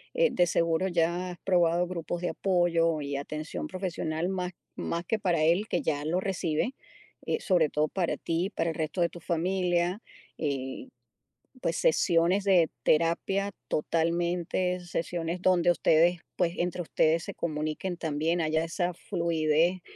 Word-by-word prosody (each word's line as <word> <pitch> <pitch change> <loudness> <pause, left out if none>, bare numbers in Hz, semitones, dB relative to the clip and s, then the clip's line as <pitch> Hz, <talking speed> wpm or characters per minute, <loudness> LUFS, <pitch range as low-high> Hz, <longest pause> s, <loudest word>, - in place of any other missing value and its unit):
eh, - - +4
de 175 - +3
seguro 165 +2 +1
ya 175 +1 0
has 175 - -7
probado 175 -1 +3
grupos 175 -1 -4
de - - +1
apoyo 170 -4 +2
y 140 -1 -3
atención 155 +2 -5
profesional 175 -3 -3
más 180 -1 -3 0.2
más 170 +1 -3
que 225 - 0
para 175 -5 +1
él, 175 +7 +3
que - - 0
ya 145 -2 -1
lo 175 +4 +1
recibe, 185 - -1 0.5
eh, - - 0
sobre 175 - +2
todo 150 +2 +1
para 175 +1 -1
ti 165 +2 -1
y - - -2
para 165 -5 -1
el - - -8
resto 160 +2 -2
de 170 - +3
tu 175 - -11
familia, 175 +2 0 0.4
eh, 135 - -3 0.7
pues 165 - 0
sesiones 170 +4 +3
de 180 -5 +4
terapia 180 +5 +1 0.2
totalmente, 170 +3 0
sesiones 170 0 -3
donde 180 -2 +3
ustedes, 170 +1 +3 0.2
pues 170 -1 +1
entre 175 0 -1
ustedes 160 0 +2
se - - -7
comuniquen 155 +3 -3
también, 160 +2 0
haya 160 0 +1
esa 175 +2 -1
fluidez, 170 -1 +1
170 Hz, 155 wpm, -28 LUFS, 160-180 Hz, 0.7 s, eh